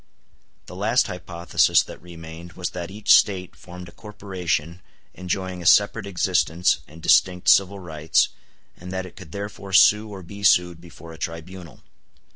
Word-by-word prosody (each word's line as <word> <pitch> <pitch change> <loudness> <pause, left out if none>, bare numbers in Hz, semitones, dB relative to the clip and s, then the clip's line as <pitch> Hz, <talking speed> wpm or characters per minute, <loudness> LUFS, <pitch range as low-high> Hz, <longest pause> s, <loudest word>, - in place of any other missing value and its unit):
] - - -41
The - - -11
last 110 +6 +1
hypothesis 85 -2 +1
that - - -12
remained 85 0 -11
was 90 - -5
that 85 -1 -6
each 105 +2 +3
State 95 -3 +2
formed 90 0 -11
a - - -13
corporation 90 -6 -4 0.3
enjoying 95 0 -4
a 85 - -2
separate 100 +3 +4
existence 90 -2 +1
and 80 +2 -15
distinct 90 -1 +3
civil 100 +1 +4
rights, 80 -2 0 0.5
and 90 +1 -10
that 95 0 -4
it 95 - -13
could 90 -5 -13
therefore 100 0 -7
sue 105 +3 +5
or 95 -3 -9
be 100 +4 -11
sued 90 -4 +3
before 85 -1 -13
a 80 - -14
tribunal. 85 +1 -8
90 Hz, 160 wpm, -23 LUFS, 85-95 Hz, 0.5 s, sue